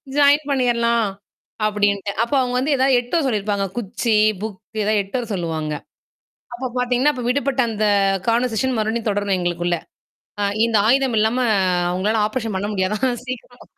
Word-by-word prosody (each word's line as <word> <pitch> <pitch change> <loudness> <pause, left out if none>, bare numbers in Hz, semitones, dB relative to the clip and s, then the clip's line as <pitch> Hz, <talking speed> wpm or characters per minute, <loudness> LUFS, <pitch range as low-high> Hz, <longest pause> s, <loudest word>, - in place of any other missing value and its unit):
Join 290 0 +4
பண்ணிர்லாம். 235 -4 +2 0.6
அப்பிடின்ட்டு. 205 -1 0
அப்ப 235 - -4
அவுங்க 250 -1 0
வந்து 285 +3 +1
ஏதாவது 265 0 +3
எடுத்துட்டு 245 +7 -1
வர 275 - 0
சொல்லியிருப்பாங்க. 205 -3 -1
குச்சி, 230 +1 -1 0.3
புக் 215 -3 -5 0.2
ஏதாவது 210 0 +2
எடுத்துட்டு 200 +6 -3
வர 235 - -8
சொல்லுவாங்க. 160 -4 -3 0.8
அப்ப 255 +2 -4
பார்த்தீங்கன்னா, 250 +4 +2
அப்ப 250 -2 -5
விடுபட்ட 270 0 +1
அந்த 215 0 -1 0.4
கான்வர்சேஷன் 245 +2 +1
மறுபடியும் 220 +1 -1
தொடரும் 200 -1 0
எங்களுக்குள்ள. 175 0 -1 0.6
அ - - 0 0.2
இந்த 230 -1 +1
ஆயுதம் 260 -2 +3
இல்லாம 220 +4 +2 0.6
உங்களால 210 +4 +1
ஆப்ரேஷன் 225 -2 -3
பண்ண 200 +2 -2
முடியாதாம் 200 +6 0 0.2
சீக்கிரம் 250 -1 -8
230 Hz, 150 wpm, -21 LUFS, 205-255 Hz, 0.8 s, Join